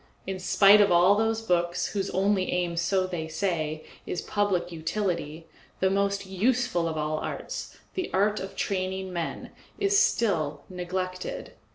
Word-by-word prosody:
In 190 0 -4
spite 200 +2 +6
of 200 -2 +4
all 175 +3 +6
those 225 +1 0
books, 175 -3 0
whose 200 -1 -2
only 195 0 +1
aim, 175 -1 0
so 185 +3 +1
they 175 -3 -4
say, 160 -2 -2 0.2
is 175 - -3
public 190 -4 0
utility, 165 -2 -3 0.3
the 190 0 +2
most 200 0 0
useful 195 -2 +1
of 160 -1 -3
all 155 0 -1
arts, - - -5 0.2
the 370 -2 -3
art 205 +2 +2
of 195 0 -7
training 190 -1 -2
men, 170 -2 -4 0.3
is 400 0 +3
still 155 - +1
neglected. 185 - -4
185 Hz, 150 wpm, -27 LUFS, 170-200 Hz, 0.3 s, spite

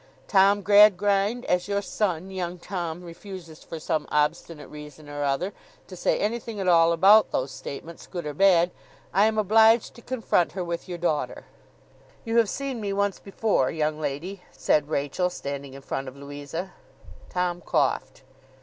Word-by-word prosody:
Tom 200 0 +4
Gradgrind, 205 +2 +4
as 180 +1 0
your 200 0 -1
son, 190 -3 -2
young 180 -1 -4
Tom, 175 -2 -5
refuses 170 -2 -10
for 165 - -7
some 155 0 -2
obstinate 150 +1 -1
reason 150 0 -11
or 145 0 -4
other 145 +8 -1 0.3
to 185 - -10
say 175 - +1
anything 225 0 -3
at 190 - -2
all 165 -1 +5
about 195 +6 +6
those 130 +1 -2
statements, 165 +4 -8
good 175 -4 -6
or 150 - -4
bad, 175 0 +4 0.4
I 205 +2 +5
am 220 0 -1
obliged 220 +2 +4
to 235 - -14
confront 225 -8 0
her 185 - -3
with 170 +1 -5
your 175 - -4
daughter.' 160 -3 -2 0.8
'You 230 0 0
have 230 -3 +4
seen 270 -4 -4
me 200 -1 -2
once 200 0 0
before, 195 - 0
young 155 -1 -1
lady,' 155 +7 -4
said 150 -1 +1
Rachael, 155 +5 0
standing 140 -5 -6
in 135 - -11
front 135 0 -4
of 130 +1 -9
Louisa. 145 +6 -7 0.6
Tom 180 -1 -1
coughed. - - -1
180 Hz, 165 wpm, -25 LUFS, 155-200 Hz, 0.8 s, about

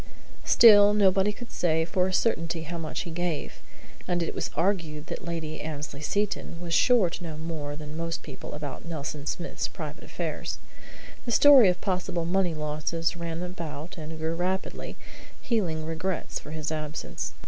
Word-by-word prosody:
Still, 205 -2 +8
nobody 195 0 +4
could 240 +3 -10
say 160 -2 +1
for 180 +1 +1
a - - -2
certainty 165 -6 +1
how 170 +1 -5
much 155 -2 -3
he 170 - -6
gave, 170 -2 -3 0.5
and 175 -1 +1
it - - -3
was - - -2
argued 165 -4 0
that - - -6
Lady 165 -2 -4
Annesley 150 -1 -5
Seton 200 0 -1
was 170 -1 -4
sure 220 -4 +5
to 175 - -6
know 160 -2 -5
more 155 -2 -4
than 150 0 -8
most 165 0 -3
people 140 -4 -8
about 150 -2 -6
Nelson 150 -3 -5
Smith's 175 - -2
private - - -7
affairs. - - -4 0.7
The 240 - -2
story 265 -4 +8
of 180 0 -1
possible 180 -3 -1
money 180 -1 +1
losses 155 +2 -1
ran 170 0 -4
about 170 -2 -6
and 160 -1 -7
grew 160 +1 -1
rapidly, 185 +3 -2 0.4
healing 175 -10 0
regrets 165 +3 -2
for - - -11
his 155 0 -3
absence. 155 0 -4
165 Hz, 165 wpm, -27 LUFS, 155-185 Hz, 0.7 s, Still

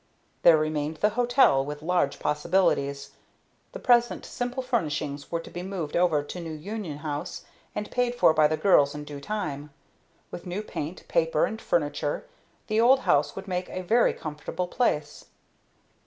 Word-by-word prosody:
There 165 -2 +7
remained 155 0 -1
the 210 - +3
hotel, 245 - +4
with 145 +1 -7
large 175 -4 +1
possibilities. 150 -3 0 0.6
The - - -7
present 240 - +2
simple 245 +2 -3
furnishings 150 - -2
were 170 - 0
to - - -12
be 175 - -5
moved 180 -5 -4
over 170 -4 +3
to 180 - -7
New 165 -2 -6
Union 185 -1 -5
House, 150 -1 -5 0.3
and 210 - -4
paid 245 -1 0
for 200 -9 +5
by 155 -1 +5
the 155 +1 -1
girls 145 -7 +4
in 150 - -5
due 145 -1 -8
time. 150 -7 -4 0.6
With 175 - -8
new 185 +4 -3
paint, 165 -3 -6
paper, 165 -2 +2
and 220 +1 -5
furniture, 145 -2 -1 0.4
the 215 +1 +1
old 260 +3 +5
house 145 +1 +2
would 195 +1 -7
make 180 -1 -3
a 185 - -5
very 230 +6 +3
comfortable 155 +4 -5
place. 150 -9 -1
170 Hz, 165 wpm, -26 LUFS, 150-210 Hz, 0.6 s, There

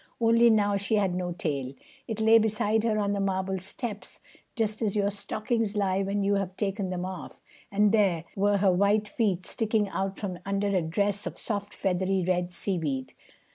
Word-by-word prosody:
Only 230 0 +5
now 205 -2 +3
she 200 +2 0
had 195 -3 +1
no 180 0 -2
tail. 140 -6 -3 0.3
It 220 -2 -3
lay 220 +1 +6
beside 215 0 +1
her 220 -2 +1
on 205 -1 0
the 200 - -1
marble 190 -1 -1
steps, 210 +3 -6 0.4
just 215 -1 -1
as 215 -3 0
your 200 -1 +1
stockings 215 +2 -2
lie 195 -1 +1
when 200 +1 -1
you 200 +1 +2
have 190 -1 -4
taken 195 -2 -2
them 180 0 -3
off; 185 -1 -8 0.3
and 205 +1 +3
there 195 -7 +2
were 205 +1 +2
her 195 -1 +4
white 205 +3 +2
feet 195 -5 0
sticking 215 -2 0
out 195 0 -2
from 185 -4 -4
under 200 +1 -1
a 185 - +3
dress 200 +5 -1
of - - -6
soft 205 -2 -4
feathery 190 0 0
red 180 -1 0
seaweed. 160 -8 -2
200 Hz, 185 wpm, -27 LUFS, 185-210 Hz, 0.4 s, lay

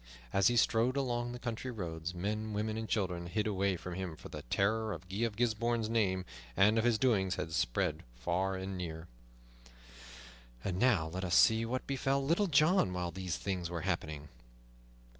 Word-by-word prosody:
As 100 -1 +5
he 120 - +3
strode 120 +3 +3
along 120 -3 -1
the 125 - -5
country 120 0 -4
roads, 90 -6 -4
men, 105 +4 -2
women, 110 +1 -1
and 110 0 -4
children 90 -4 -1
hid 105 +4 -1
away 100 -3 +1
from 90 +1 -6
him, 90 -3 -4
for - - -11
the - - -7
terror 110 - 0
of 85 +2 -9
Guy 95 +2 -5
of 110 -3 -3
Gisbourne's 115 0 0
name 95 -5 +1 0.3
and 105 +3 +5
of - - +1
his 120 -2 +3
doings 100 -7 +2
had 80 - -4
spread - - 0
far 90 +10 -1
and 95 +1 -4
near. 80 -2 -5 1.6
And 95 -1 -2
now 105 -11 +3
let 95 +3 -4
us 85 -2 +1
see 115 +1 +5
what 130 +2 -2
befell 135 0 0
Little 170 +8 +2
John 155 - +4
while 90 -1 -2
these 90 0 -3
things 90 -4 -3
were 85 -1 -3
happening. 80 -5 -3
100 Hz, 180 wpm, -33 LUFS, 90-115 Hz, 1.6 s, As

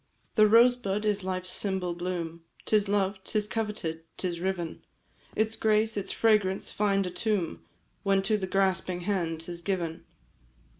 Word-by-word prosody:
"The 215 -1 +6
rosebud 230 -2 +4
is 205 -2 +1
life's 185 -1 -3
symbol 190 -3 -1
bloom, 170 -1 -4 0.2
'Tis 210 -2 +2
loved, 195 -1 0
'tis 210 +1 0
coveted, 210 -7 -3 0.2
'tis 175 -2 -2
riven 175 -2 -3 0.5
Its 220 +1 +1
grace, 220 0 +2
its 200 - -2
fragrance, 210 -4 +2
find 200 -2 +1
a 180 - -3
tomb, 180 - -1 0.4
When 195 -1 +2
to 215 +2 +2
the 195 -3 -2
grasping 185 -2 +1
hand 170 -4 -1
'tis 170 +1 -5
given. 170 -4 -2
195 Hz, 145 wpm, -28 LUFS, 180-210 Hz, 0.5 s, The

